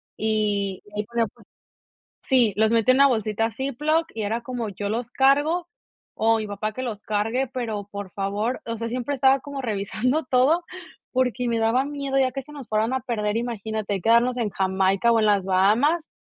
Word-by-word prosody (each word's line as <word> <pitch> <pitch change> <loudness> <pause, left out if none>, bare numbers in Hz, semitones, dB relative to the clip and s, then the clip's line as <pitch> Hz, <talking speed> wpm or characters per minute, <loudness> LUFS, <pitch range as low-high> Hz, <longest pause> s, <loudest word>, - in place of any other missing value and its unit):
y, 205 -3 -1
ahí 210 - -1
ponía, 235 +1 0
pues - - -20 0.8
sí, 245 -7 +3
los 220 +1 +3
metía 230 +2 +4
en - - +2
una 280 - +8
bolsita 225 -2 0
Ziploc, 290 +7 0
y 225 - -4
era 220 +3 -1
como: 240 -2 -4
"Yo 200 +1 -4
los 235 +2 -2
cargo, 290 +6 +2 0.5
o 225 0 +3
mi 215 - -3
papá, 205 +1 -3
que 255 - -5
los 225 -5 -4
cargue, 225 +5 -1
pero, 220 -6 -4
por 200 -2 -6
favor". 205 +6 -2
O 230 - -3
sea, 230 +1 -3
siempre 250 +4 -2
estaba 265 +1 +4
como 280 0 -6
revisando 225 +7 -1
todo, 275 +7 +3 0.5
porque 250 -1 0
me 235 -1 0
daba 230 +4 +2
miedo 280 -2 -2
ya, 260 -1 +2
que 270 +1 -5
se 295 - -15
nos 280 -5 -9
fueran 220 +3 +1
a 260 - +1
perder. 215 -4 -2
Imagínate, 220 -3 -3
quedarnos 235 +3 +3
en 230 -3 0
Jamaica, 190 +3 +2
o 230 - +4
en 215 - +2
las 205 -2 +3
Bahamas, 230 - +2
230 Hz, 190 wpm, -24 LUFS, 210-260 Hz, 0.8 s, una